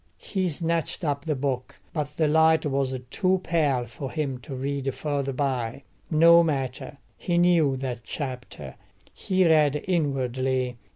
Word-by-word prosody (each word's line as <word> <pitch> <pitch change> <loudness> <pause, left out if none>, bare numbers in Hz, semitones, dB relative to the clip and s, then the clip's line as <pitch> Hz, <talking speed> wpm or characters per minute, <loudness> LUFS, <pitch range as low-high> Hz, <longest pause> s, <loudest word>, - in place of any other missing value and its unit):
He 190 -3 -2
snatched 165 +3 -2
up 145 -1 -1
the 155 -2 0
book, 130 -2 -3 0.2
but 150 -2 -4
the 155 - +3
light 160 +1 +4
was 135 -2 -1
too 185 -1 +2
pale 145 -7 +1
for 130 +3 -7
him 140 -4 -3
to 130 +2 -8
read 135 +1 -2
further 140 -2 -2
by. 130 -2 -2 0.3
No 170 +1 +7
matter: 140 -4 -2 0.2
he 175 -1 -1
knew 170 -6 +4
that 130 -2 -4
chapter; 125 - -6 0.4
he 185 -1 +1
read 150 -2 +3
inwardly. 130 -6 0
140 Hz, 140 wpm, -25 LUFS, 130-160 Hz, 0.4 s, No